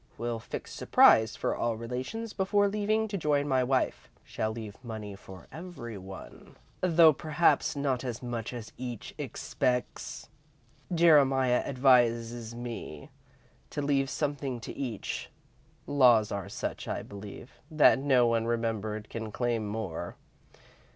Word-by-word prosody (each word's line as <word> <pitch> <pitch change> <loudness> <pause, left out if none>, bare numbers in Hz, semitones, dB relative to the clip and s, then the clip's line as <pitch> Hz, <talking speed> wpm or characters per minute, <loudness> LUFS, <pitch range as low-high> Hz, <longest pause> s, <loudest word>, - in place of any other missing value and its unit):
Will 115 0 -3
fix - - -7
surprise 110 0 +5
for - - -1
all 120 -1 -1
Relations 130 - -5
before 205 +1 +2
leaving 215 +2 0
to 200 -2 -3
join 145 -2 +1
my 130 -2 +2
wife. 130 0 0
Shall 110 - -3
leave 110 -3 -7
money 110 -4 -6
to 95 -2 -12
every 160 -10 -8
one, 95 0 -11 0.3
though 165 -3 +6
perhaps 155 +3 +2
not 135 -3 -1
as 125 -1 -5
much 120 -2 -4
as 120 -3 -7
each 120 -3 -6
expects. 125 -1 -2 0.6
Jeremiah 135 -7 +4
advises 120 -3 +2
me 120 -11 -7 0.6
to 145 - -3
leave 135 -1 +1
something 140 -2 -2
to - - -7
each. 120 -7 -4 0.6
Laws 125 -7 +4
are 100 -2 -4
such, - - -5
I - - -3
believe, 100 +5 -10
that 155 -4 +5
no 130 -3 +4
one 115 -1 +1
remembered 110 -2 -2
can 110 -2 -6
claim 115 -2 -1
more. 100 -6 -4
125 Hz, 130 wpm, -29 LUFS, 110-145 Hz, 0.6 s, though